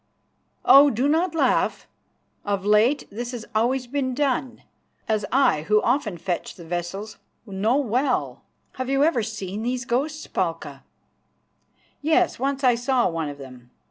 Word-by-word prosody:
Oh! 280 +2 +8
do 250 +3 0
not 325 +3 +1
laugh. - - +1 0.6
Of 200 -1 -2
late 220 +7 +3
this 240 +4 -5
has 235 -2 -6
always 245 +4 +1
been 260 0 -2
done, 265 -3 -1 0.4
as 215 -2 0
I 260 - +3
who 210 0 +4
often 235 -7 0
fetch 175 +1 -4
the 170 - -12
vessels 175 +5 -5 0.3
know 210 +5 0
well." 255 0 -1 0.4
"Have 255 0 -3
you 275 +1 +2
ever 305 -6 +2
seen 210 -2 -5
these 250 +2 -2
ghosts, 290 +5 -2
Palka?" - - -4 1.2
"Yes, 320 +1 +2
once 275 +1 -2
I 250 -2 +5
saw 245 +1 +1
one 165 -3 -3
of 145 - -8
them. 130 -3 -12
240 Hz, 145 wpm, -23 LUFS, 205-275 Hz, 1.2 s, Oh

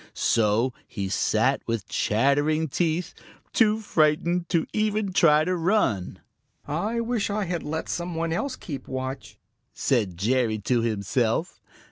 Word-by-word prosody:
So 115 +3 +2
he 100 -2 -4
sat 110 +7 +1
with 115 -4 -2
chattering 145 +10 +1
teeth, 165 +4 -1 0.4
too 220 -3 +3
frightened 170 0 +1
to 165 -2 +1
even 215 -2 0
try 155 -4 +5
to 180 +3 0
run. 165 - 0 0.5
"I 205 +11 -1
wish 230 -3 -1
I 205 0 -1
had 175 -2 -2
let 160 +2 -4
some 175 0 -3
one 165 0 -1
else 255 +9 -2
keep 140 -6 -7
watch," 130 +1 -5 0.4
said 105 -10 0
Jerry 115 +2 +1
to 115 +3 0
himself. 115 - -1
155 Hz, 135 wpm, -25 LUFS, 115-180 Hz, 0.5 s, try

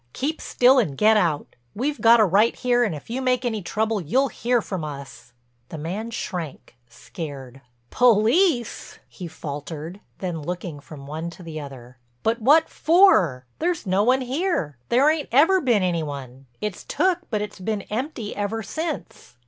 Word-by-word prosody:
Keep 300 +4 -3
still 255 +2 +4
and 155 - -1
get 220 +1 +5
out. 170 -8 0 0.2
We've 265 +2 -2
got 235 0 +7
a 215 - +6
right 205 +5 +3
here 245 -1 +2
and 205 -9 -1
if 145 - -10
you 255 +3 -2
make 255 -1 +1
any 220 -3 -1
trouble 215 +3 -1
you'll 260 - +1
hear 245 +1 0
from 190 -6 -5
us." 140 -4 -8 0.4
The 160 - -7
man 185 +9 -4
shrank, 175 - -6
scared. 135 - -9 0.3
"Police!" 245 - +2
he 180 - -8
faltered, 155 +3 -7 0.2
then 175 -4 -4
looking 170 -1 -5
from 140 -1 -12
one 160 +4 -5
to 175 +2 -12
the 160 -2 -6
other. 125 -4 -11 0.2
"But 230 +1 0
what 300 +7 +5
for? 250 - +4
There's 345 0 -1
no 190 +1 +2
one 255 +5 +3
here, 255 - -2
there 260 +5 +4
ain't 310 -1 +1
ever 330 +9 +5
been 235 - +2
any 175 -2 0
one—it's 135 - -7
took 365 -1 +1
but 210 -3 -1
it's 210 - -8
been 205 +1 -2
empty 235 -1 -4
ever 210 +2 -2
since." 315 - -6
210 Hz, 165 wpm, -23 LUFS, 155-250 Hz, 0.4 s, got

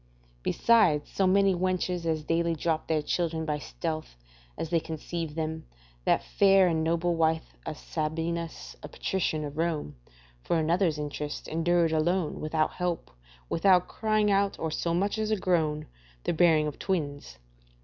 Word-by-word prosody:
Besides 170 - +3
so 195 - +2
many 195 +1 +4
wenches 180 -1 -1
as 160 -1 0
daily 165 +1 +1
drop 160 0 -1
their 155 -2 +1
children 160 0 -1
by 150 -1 -1
stealth, 155 - -5 0.4
as 165 - -4
they 170 - +3
conceived 160 0 -5
them, 160 0 -3 0.4
that - - +3
fair 195 -2 +4
and 160 -2 +1
noble 170 +2 +1
wife 160 0 0
of 155 - -4
Sabinus, 165 +1 -3
a - - -7
patrician 155 -1 -2
of 145 +2 -7
Rome, 160 - -1 0.5
for 170 - 0
another's 165 0 +2
interest, 150 0 -5
endured 165 +1 +2
alone, 160 +1 0
without 155 0 0
help, 175 - -3 0.4
without 180 +1 +3
crying 215 -1 +1
out, 200 0 +2
or 160 - -3
so 170 +2 -1
much 200 +4 0
as 215 0 -1
a 215 - +2
groan, 160 -6 0 0.4
the - - 0
bearing 160 -2 +4
of 150 -2 -5
twins. 145 - -3
165 Hz, 155 wpm, -28 LUFS, 155-180 Hz, 0.5 s, many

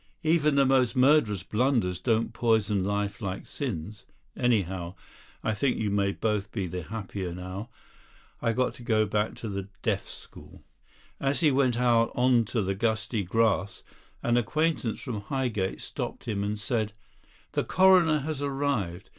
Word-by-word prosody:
Even 155 -2 +3
the 140 -1 +5
most 130 -2 +3
murderous 125 - +4
blunders 110 -5 +1
don't 115 +1 0
poison 110 -4 +2
life 100 +2 -2
like 95 -2 -4
sins; 95 +4 -5 0.3
anyhow, 95 -7 0 0.5
I 110 - +1
think 130 +4 0
you 105 -2 -1
may 100 -1 +2
both 105 0 -2
be 100 -4 -2
the 90 +1 -4
happier 95 -1 -5
now. 95 +5 -6 0.7
I've 115 -1 +1
got 125 -2 +1
to 120 - -13
go 110 -3 +2
back 105 +1 -1
to 115 - -6
the 100 -1 -4
Deaf - - 0
School." - - -13 0.6
As 140 +3 0
he 155 -3 +5
went 130 -3 +2
out 120 -2 +3
on 125 -2 +4
to 110 0 -1
the 95 +1 0
gusty 110 +1 -1
grass 100 -1 0 0.4
an 120 0 +2
acquaintance 150 0 0
from 115 -7 -4
Highgate 110 -4 -2
stopped - - -5
him 100 -2 -1
and 105 +1 -2
said: 110 -1 -1 0.6
"The - - 0
Coroner 180 -5 +5
has 150 0 -4
arrived. 135 -10 -2
110 Hz, 155 wpm, -28 LUFS, 100-130 Hz, 0.7 s, the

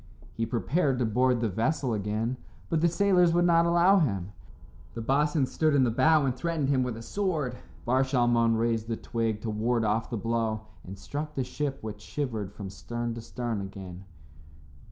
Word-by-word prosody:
He 115 0 -2
prepared 135 +4 0
to 125 - +1
board 125 +2 +2
the 115 - +1
vessel 120 - 0
again, 110 +4 -2 0.3
but 160 -2 +2
the 170 - +5
sailors 180 -1 +3
would 175 0 +4
not 170 -1 +4
allow 175 +3 +5
him. 100 - -1 0.6
The 115 - -4
boatswain 145 +4 +2
stood 155 +3 +1
in 135 - +5
the 120 - +2
bow 155 +5 +4
and 130 -2 0
threatened 155 0 -1
him 135 -2 +3
with 125 -3 -2
a 115 - -8
sword. 160 - -1 0.3
Bar 130 +2 +3
Shalmon 120 -3 +2
raised 115 -1 0
the 115 -1 -2
twig 115 -2 -2
to 110 - -3
ward 115 +2 0
off 110 +2 0
the 120 - -3
blow 115 0 -1 0.2
and 95 +2 -9
struck 145 +10 -5
the 135 - 0
ship 140 +1 -3
which 105 -1 -6
shivered 110 -6 -4
from 100 -2 -8
stern 120 +4 -4
to 115 - -7
stern 115 -2 -4
again. 95 -1 -8
120 Hz, 190 wpm, -28 LUFS, 110-150 Hz, 0.6 s, the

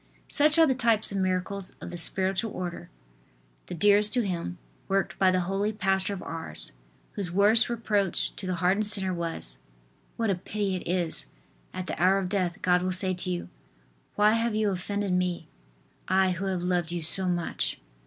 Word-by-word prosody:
Such 305 +2 +3
are 325 - +7
the 270 - +2
types 230 -5 +2
of 195 - -2
miracles 185 +1 -2
of - - -8
the - - -6
spiritual 190 +5 +2
order, 175 -1 -5 0.8
the - - -5
dearest 205 +3 +5
to 245 - +3
him, 170 - -3 0.3
worked 195 -2 -1
by 190 - +5
the 185 0 +2
holy 195 +4 -1
pastor 195 -2 +1
of 195 -2 -5
Ars, 165 -1 -6 0.4
whose 195 -4 -4
worst 210 +6 +4
reproach 210 -5 0
to 190 - -5
the 185 - -1
hardened 185 +5 +1
sinner 195 -3 +2
was: 165 - -4 0.6
"What 225 -3 +1
a - - +3
pity 195 +2 -2
it - - -8
is! 175 -2 -1 0.4
At 185 - -5
the - - -5
hour 185 +2 +5
of 190 -2 -2
death 180 -3 -1
God 180 -1 +3
will 185 +1 -1
say 185 +1 +2
to 185 0 -4
you: 175 -1 -3 0.7
"Why 210 +1 +5
have 230 -1 0
you 215 -1 +1
offended 200 +1 -2
Me. 180 -1 -1 0.6
I 190 0 +3
who 185 +2 -3
have 185 -2 -2
loved 175 -2 0
you 175 -1 -3
so 185 +4 0
much."" 175 -2 -2
190 Hz, 185 wpm, -27 LUFS, 180-205 Hz, 0.8 s, are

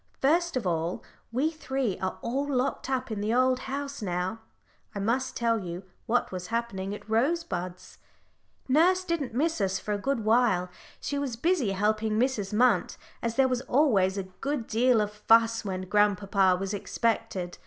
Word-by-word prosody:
First 335 +2 +2
of 240 - -3
all 170 0 -1 0.3
we 275 +7 +1
three 265 - -2
are 190 0 -3
all 275 +5 -1
locked 260 0 -1
up 260 -2 -1
in 210 -2 -3
the 210 +1 0
old 255 0 +3
house 280 0 -5
now 185 +2 -2 0.6
I - - -2
must 250 +6 0
tell 230 -1 +1
you 180 -1 -6 0.2
what 245 +2 +1
was 180 -1 -5
happening 205 -4 -3
at 210 - -12
Rosebuds. 220 - -2 0.7
Nurse 350 +7 +4
didn't 330 -9 -2
miss 315 -1 +1
us 190 -1 +1
for 210 +2 -3
a 205 - -2
good 255 -1 -1
while; 215 -6 +3 0.3
she 285 - -3
was 270 -5 -2
busy 270 - +1
helping 215 +2 +1
Mrs. 230 -5 0
Munt, 215 -3 +2 0.2
as 230 -1 -2
there 270 -1 +4
was 250 -1 -1
always 210 -11 +2
a 195 - -1
good 240 +7 -4
deal 235 +1 +3
of 210 0 -2
fuss 225 +2 +3
when 190 -3 -3
grandpapa 200 -1 +3
was 195 +1 -3
expected. 205 -4 -2
225 Hz, 170 wpm, -28 LUFS, 195-265 Hz, 0.7 s, Nurse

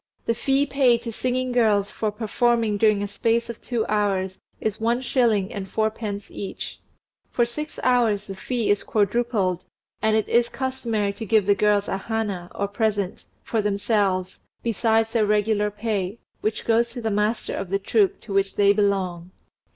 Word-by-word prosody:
The 230 - +2
fee 270 +4 +1
paid 255 -4 +3
to 230 -1 -5
singing 255 +2 -1
girls 215 -5 +2
for 215 -1 -2
performing 225 0 +1
during 210 -1 +3
a - - -2
space 230 +3 0
of 230 - -13
two 235 -3 -1
hours 195 -3 0 0.2
is 215 0 -2
one 235 +2 +1
shilling 230 -7 +1
and 190 -2 -5
fourpence 215 -1 -2
each; 195 - -6 0.5
for 240 - +2
six 300 +6 -6
hours 230 -5 +2
the 195 - -6
fee 230 +2 -1
is 205 - +2
quadrupled, 205 -4 0 0.4
and 220 0 +3
it 220 - +1
is 235 0 +3
customary 235 -5 -2
to 210 +3 -6
give 220 -2 +4
the 205 - +5
girls 205 0 +2
a - - -1
hana, 200 -4 -3
or 200 - -1
present, 205 -2 -1 0.2
for 225 - 0
themselves, 200 -2 0 0.2
besides 225 0 +1
their 220 -3 +2
regular 210 0 +2
pay, 210 -1 -2 0.2
which 215 +1 -2
goes 235 +1 +3
to 240 +1 -7
the 220 - 0
master 210 +3 0
of 195 - -4
the 195 - +1
troupe 395 - +1
to 205 - -7
which 195 0 +1
they 200 0 +5
belong. 190 -4 0
215 Hz, 175 wpm, -24 LUFS, 200-235 Hz, 0.5 s, the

